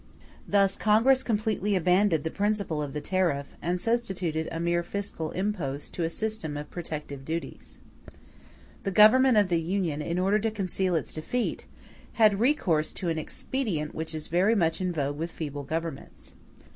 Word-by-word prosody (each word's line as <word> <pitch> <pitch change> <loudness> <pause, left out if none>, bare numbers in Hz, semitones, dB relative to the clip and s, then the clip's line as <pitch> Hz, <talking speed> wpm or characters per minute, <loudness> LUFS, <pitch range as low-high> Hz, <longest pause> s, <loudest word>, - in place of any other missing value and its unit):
*e - - -26 0.2
Thus 195 -1 +3
Congress 230 +5 +4
completely 210 -3 0
abandoned 180 -2 +3
the 160 - -2
principle 200 -6 0
of 145 -2 -4
the 150 - -3
tariff; 170 -7 0
and 175 +3 -1
substituted 185 -8 -1
a 165 - -3
mere 170 +1 +1
fiscal 170 -3 -4
impost 180 -8 -3
to 175 - -2
a 165 - 0
system 190 -6 -3
of 150 - -7
protective 150 -5 -6
duties. 165 +4 -6 0.3
*f - - -14 0.7
The 195 - -2
Government 220 +5 +6
of 205 -3 +4
the 170 -2 +2
Union, 170 -3 -1
in 170 +3 -2
order 195 +3 +3
to 225 +2 0
conceal 190 -3 -1
its 160 - -2
defeat, 230 +10 -2 0.5
had 215 -3 +4
recourse 200 - +2
to 175 - -2
an 160 -1 -1
expedient 165 - -3
which 160 0 -3
is 155 - -5
very 190 +7 +3
much 165 -3 +1
in 185 -1 0
vogue 145 -3 -2
with 165 +1 -2
feeble 145 -4 -5
governments. 165 0 -5
180 Hz, 170 wpm, -27 LUFS, 160-210 Hz, 0.7 s, Government